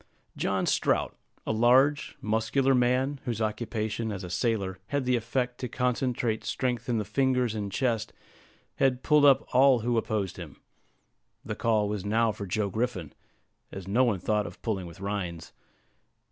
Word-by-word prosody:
John - - 0
Strout, - - +1 0.3
a - - -1
large, 130 +6 +3
muscular 110 +5 +1
man, 130 +3 +1
whose 115 -3 -2
occupation 110 0 -2
as 100 -2 -5
a 90 - -7
sailor 95 -1 -1
had 140 0 -1
the 125 0 +2
effect 125 +2 -2
to 125 - -3
concentrate 125 -2 -1
strength 125 -2 -2
in 120 - +1
the 105 - -1
fingers 125 +1 +1
and 105 -2 -4
chest, 115 -1 -1 0.7
had 130 -2 +1
pulled 150 -1 +5
up 140 -2 +5
all 130 -1 +5
who 120 0 +1
opposed 100 -4 -3
him. 85 -6 -9 0.9
The - - -3
call 110 -2 +1
was 105 -2 -3
now 110 +2 +2
for 100 -1 -7
Joe 100 +2 -1
Griffin, 110 - -2 0.6
as 95 -1 -8
no 115 +7 +3
one 115 -6 +2
thought 105 +4 0
of - - -11
pulling 95 -6 -2
with 85 +1 -12
Rhines. 95 -4 -4
115 Hz, 160 wpm, -28 LUFS, 105-125 Hz, 0.9 s, pulled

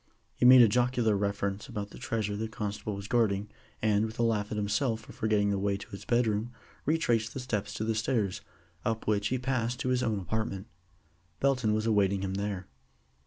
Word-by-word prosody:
He - - 0
made 125 -1 +10
a - - +7
jocular 120 -1 +2
reference 100 0 -2
about 100 -1 -5
the - - -11
treasure 105 -2 -2
the 110 +2 -2
constable 105 -1 -4
was 100 0 -7
guarding, 105 -4 +1 0.3
and, 105 -1 +3
with 110 0 -4
a 120 - +1
laugh 105 -3 +1
at 105 - -3
himself 110 +3 0
for - - -13
forgetting 105 -2 +1
the 100 - 0
way 100 0 0
to 100 - -11
his 100 - -9
bedroom, 115 -1 +1 0.4
retraced 120 -8 +1
his 130 - -5
steps 105 -5 -2
to 110 - -2
the 110 0 0
stairs, 110 -3 0 0.4
up 115 -1 -1
which 105 -1 +1
he 130 - 0
passed 125 -1 -1
to 130 - -1
his 125 -1 +2
own 110 -4 0
apartment. 100 0 -3 0.7
Belton 125 -6 +2
was 110 +1 -1
awaiting 100 -3 +2
him 95 -1 -2
there. 100 -1 -3
110 Hz, 200 wpm, -30 LUFS, 100-115 Hz, 0.7 s, made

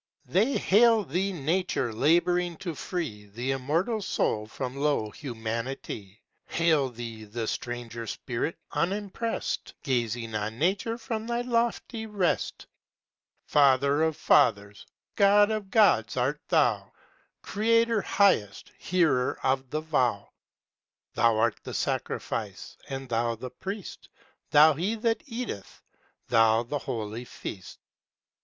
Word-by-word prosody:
They 220 +10 +2
hail 225 +2 +5
Thee 185 +5 -1
Nature 165 -6 -1
labouring 175 +6 +2
to 180 -3 -5
free 135 - -5
The 120 +6 -3
Immortal 165 - 0
Soul 105 - -1
from 125 +3 -5
low 140 -7 0
humanity; 115 -4 -5 0.2
Hail 160 -5 +2
Thee 115 -2 -8
the 110 +2 -4
stranger 120 -1 -5
Spirit, 120 +9 -3
unimpressed, 205 +5 -2
Gazing 120 -4 -1
on 110 +1 -3
Nature 195 - 0
from 225 -2 -4
thy 240 0 -1
lofty 235 -1 -1
rest. 200 -5 -1 0.8
Father 140 +1 +4
of 160 -1 +1
fathers, 100 -7 +2 0.3
God 205 +1 +5
of 215 -3 -3
gods 195 - +3
art 135 +4 0
thou, 120 - +2 0.5
Creator, 230 +1 +2
highest, 190 - +2
hearer 160 -8 +1
of 130 0 0
the 155 +3 -2
vow! 125 -10 0 0.8
Thou 115 -2 +3
art 115 0 +1
the - - -7
sacrifice, - - -3
and 135 0 -5
Thou 115 0 0
the 125 +2 -8
priest, 195 0 -7 0.4
Thou, 155 +1 +7
he 185 +10 -1
that 225 0 0
eateth; 230 - -6 0.4
Thou, 115 -1 +4
the 145 +5 -3
holy 115 -1 -4
feast. 95 -6 -8
145 Hz, 120 wpm, -27 LUFS, 115-195 Hz, 0.8 s, Thou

